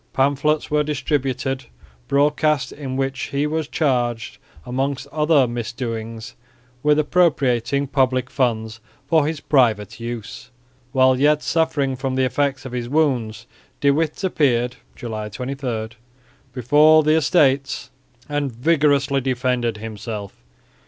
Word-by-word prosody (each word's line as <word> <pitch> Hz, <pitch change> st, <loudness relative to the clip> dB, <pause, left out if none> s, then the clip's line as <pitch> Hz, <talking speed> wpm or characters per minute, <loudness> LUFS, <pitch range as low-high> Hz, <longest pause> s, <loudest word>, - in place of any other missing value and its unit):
Pamphlets 145 Hz, +3 st, +1 dB
were 150 Hz, 0 st, +3 dB
distributed 135 Hz, -2 st, -2 dB, 0.4 s
broadcast 150 Hz, 0 st, +2 dB
in 135 Hz, -3 st, -6 dB
which 135 Hz, -1 st, -2 dB
he 140 Hz, +1 st, -1 dB
was 155 Hz, 0 st, -2 dB
charged 120 Hz, -6 st, -1 dB, 0.3 s
amongst 135 Hz, +2 st, -2 dB
other 150 Hz, -3 st, +3 dB
misdoings 115 Hz, -2 st, -5 dB, 0.5 s
with 150 Hz, +1 st, +3 dB
appropriating 140 Hz, -5 st, +2 dB
public 130 Hz, -2 st, 0 dB
funds 115 Hz, -3 st, -1 dB, 0.3 s
for 150 Hz, +1 st, +2 dB
his 160 Hz, -1 st, -3 dB
private 115 Hz, -7 st, +1 dB
use. 120 Hz, +1 st, -7 dB, 0.4 s
While 130 Hz, -1 st, +4 dB
yet 150 Hz, +1 st, +3 dB
suffering 145 Hz, -5 st, 0 dB
from 130 Hz, 0 st, -3 dB
the 130 Hz, 0 st, +2 dB
effects 135 Hz, +1 st, -1 dB
of 130 Hz, -, -6 dB
his 120 Hz, -1 st, -4 dB
wounds 125 Hz, -7 st, 0 dB, 0.3 s
De 140 Hz, -, +4 dB
Witt 155 Hz, +5 st, -1 dB
appeared 125 Hz, -9 st, +1 dB, 0.2 s
(July 110 Hz, -3 st, -5 dB
23) 125 Hz, -2 st, -4 dB, 0.6 s
before 150 Hz, +6 st, +5 dB
the 155 Hz, +1 st, +3 dB
Estates 140 Hz, -4 st, +2 dB, 0.4 s
and 145 Hz, -2 st, -2 dB
vigorously 140 Hz, +1 st, +2 dB
defended 125 Hz, -3 st, -1 dB
himself. 105 Hz, -, -7 dB
135 Hz, 120 wpm, -21 LUFS, 120-145 Hz, 0.6 s, before